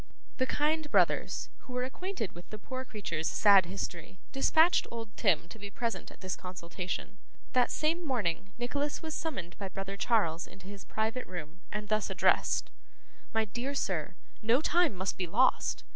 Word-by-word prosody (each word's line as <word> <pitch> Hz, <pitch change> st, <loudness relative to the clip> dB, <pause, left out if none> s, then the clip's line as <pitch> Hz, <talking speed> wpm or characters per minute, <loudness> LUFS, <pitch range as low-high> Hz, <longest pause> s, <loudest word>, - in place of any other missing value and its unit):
The 260 Hz, -, +2 dB
kind 305 Hz, +2 st, +1 dB
brothers, -, -, +2 dB
who 255 Hz, -, -11 dB
were 250 Hz, 0 st, 0 dB
acquainted 265 Hz, -, -3 dB
with 175 Hz, +1 st, -12 dB
the 215 Hz, -, -6 dB
poor 255 Hz, +5 st, -5 dB
creature's 170 Hz, -9 st, -3 dB
sad 200 Hz, -4 st, +6 dB
history, 180 Hz, -1 st, -5 dB
dispatched 320 Hz, +5 st, +4 dB
old 225 Hz, -3 st, -6 dB
Tim 170 Hz, -6 st, +2 dB
to 220 Hz, -, -10 dB
be 205 Hz, 0 st, -6 dB
present 225 Hz, -1 st, -3 dB
at -, -, -16 dB
this 185 Hz, -1 st, -2 dB
consultation. 180 Hz, +2 st, -5 dB, 0.3 s
That 250 Hz, -1 st, +4 dB
same 330 Hz, +3 st, +1 dB
morning, 205 Hz, -, -1 dB
Nicholas 285 Hz, +6 st, -2 dB
was 315 Hz, -1 st, -3 dB
summoned 225 Hz, -, -4 dB
by 195 Hz, -2 st, -3 dB
brother 195 Hz, +1 st, -5 dB
Charles 180 Hz, -8 st, +2 dB
into 190 Hz, -, -14 dB
his 200 Hz, 0 st, -9 dB
private 220 Hz, +3 st, -1 dB
room, 175 Hz, -1 st, -7 dB
and 210 Hz, 0 st, -3 dB
thus 215 Hz, 0 st, +1 dB
addressed: -, -, +2 dB, 0.6 s
'My 220 Hz, 0 st, +2 dB
dear 240 Hz, +7 st, -3 dB
sir, 185 Hz, -, -1 dB, 0.3 s
no 230 Hz, +4 st, +4 dB
time 330 Hz, -, +3 dB
must 190 Hz, +1 st, -2 dB
be 180 Hz, -, 0 dB
lost. 245 Hz, +10 st, +3 dB
215 Hz, 170 wpm, -31 LUFS, 185-255 Hz, 0.6 s, sad